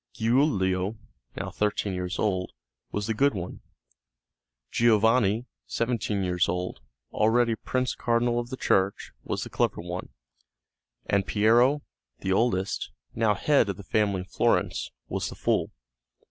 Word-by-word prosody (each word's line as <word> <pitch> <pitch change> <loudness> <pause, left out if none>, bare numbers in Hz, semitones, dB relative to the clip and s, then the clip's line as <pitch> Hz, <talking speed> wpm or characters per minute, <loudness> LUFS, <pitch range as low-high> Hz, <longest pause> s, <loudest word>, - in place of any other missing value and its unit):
Giulio, 110 -5 +1 0.4
now - - -4
thirteen 105 -1 -1
years 90 0 -3
old, 95 -3 -1 0.4
was 105 0 -2
the 110 - 0
good 140 +3 +2
one; 90 -2 -6 1.1
Giovanni, 115 0 +3 0.2
seventeen 115 -4 -1
years 90 -1 +1
old, 90 -7 -3 0.3
already 115 +2 +3
a 110 - -1
Prince 130 +3 -1
Cardinal 120 0 +1
of 120 0 -4
the 130 - -5
Church, 95 -3 +1
was - - -3
the - - -8
clever - - 0
one, 90 +1 -5 1.0
and 100 -1 +1
Piero, 120 +7 +4 0.4
the 95 - 0
oldest, 95 -3 0 0.2
now 110 -2 +2
head 140 +1 +3
of 95 - -3
the 100 - -9
family 100 -2 +1
in - - -8
Florence, - - +1 0.2
was - - -2
the - - -8
fool. - - +1
105 Hz, 140 wpm, -27 LUFS, 95-120 Hz, 1.1 s, Piero